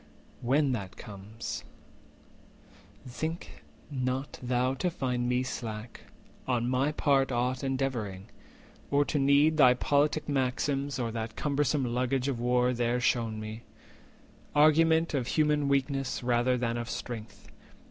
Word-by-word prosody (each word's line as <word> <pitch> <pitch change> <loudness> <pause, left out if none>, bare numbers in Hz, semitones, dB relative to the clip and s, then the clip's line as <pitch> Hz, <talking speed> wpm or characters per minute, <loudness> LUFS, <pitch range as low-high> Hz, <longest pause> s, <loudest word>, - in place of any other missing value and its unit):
When 135 +3 +2
that 100 -5 -4
comes, 105 +2 -7 1.4
think 160 +7 -5 0.3
not 130 0 -2
thou 125 +1 +1
to 155 +7 -1
find 125 -7 -2
me 125 +1 +1
slack 115 -2 -6 0.5
On 120 -2 +1
my 130 +4 +1
part 140 -3 +2
aught 125 +2 -1
endeavouring, 125 -8 -2 0.6
or 145 0 +3
to 145 - -1
need 140 +3 +4
Thy 125 -4 +7
politic 145 +4 +1
maxims, 140 +1 0
or 120 -3 -2
that 110 -1 -4
cumbersome 145 -1 0
400 120 -2 -2
Luggage 130 +1 0
of 130 -4 -1
war 125 +1 +2
there 120 0 0
shewn 115 -2 0
me—argument 155 +8 0
Of 130 -4 -1
human 150 -1 +2
weakness 135 -2 0
rather 125 +1 +2
than 120 -1 -1
of 120 0 -4
strength. 115 -3 -7
130 Hz, 125 wpm, -29 LUFS, 120-140 Hz, 1.4 s, Thy